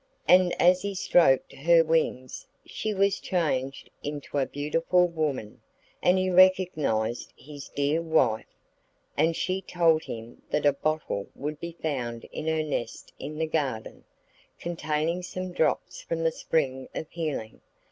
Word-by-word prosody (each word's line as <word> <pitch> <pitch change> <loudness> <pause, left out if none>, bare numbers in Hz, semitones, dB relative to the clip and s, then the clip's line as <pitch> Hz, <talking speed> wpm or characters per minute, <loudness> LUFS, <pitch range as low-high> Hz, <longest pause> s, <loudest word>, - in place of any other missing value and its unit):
And 180 0 +5
as 180 +1 +5
he 200 0 -3
stroked 165 -7 +3
her 165 +4 +4
wings 155 -6 -1 0.2
she 215 - -3
was 200 -1 +2
changed 135 -7 -2
into 145 0 -4
a 135 - +1
beautiful 165 +5 +1
woman, 150 -10 -3 0.4
and 180 +1 +4
he 185 0 +1
recognised 175 - +3
his 145 -1 -10
dear 145 +3 0
wife. 145 -9 +2 0.7
And 160 +3 +2
she 185 +3 -1
told 165 -3 +2
him 115 +1 -8
that 150 - 0
a 145 - +5
bottle 155 -8 -2
would 150 +1 -5
be 170 0 -6
found 120 -7 -2
in 155 - -5
her 160 -1 +1
nest 130 -6 -4
in 150 - -6
the 160 - 0
garden, 140 -8 -3 0.5
containing 165 0 -2
some 185 0 -5
drops 160 - 0
from 165 0 -3
the 165 - +3
spring 130 -6 -1
of - - -3
healing. 150 -10 -4
155 Hz, 145 wpm, -27 LUFS, 140-175 Hz, 0.7 s, And